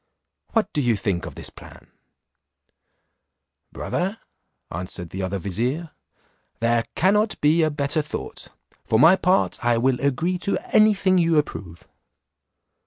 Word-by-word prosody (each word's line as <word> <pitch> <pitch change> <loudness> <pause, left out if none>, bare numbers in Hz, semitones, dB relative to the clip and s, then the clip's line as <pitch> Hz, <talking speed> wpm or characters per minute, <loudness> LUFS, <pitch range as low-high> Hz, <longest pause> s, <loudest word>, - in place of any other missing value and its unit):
What 220 -4 +1
do 150 - +1
you 120 -4 +2
think 100 -4 -2
of - - -9
this - - -7
plan?" - - -15 1.8
"Brother," 190 +5 -3 0.5
answered 90 0 -6
the 95 - -4
other 95 +1 -2
vizier, 125 - -2 0.7
"there 115 0 +1
cannot 210 +4 +2
be 155 +3 +3
a 155 - +3
better 145 +1 -1
thought; 105 - -7 0.4
for 110 - +1
my 165 +9 +7
part, 185 +1 +1
I 120 -1 +3
will 125 +1 +1
agree 160 +7 0
to 200 - -1 0.2
any 215 0 +6
thing 185 -1 +2
you 165 -2 +3
approve." 90 - -3
145 Hz, 135 wpm, -23 LUFS, 110-180 Hz, 1.8 s, my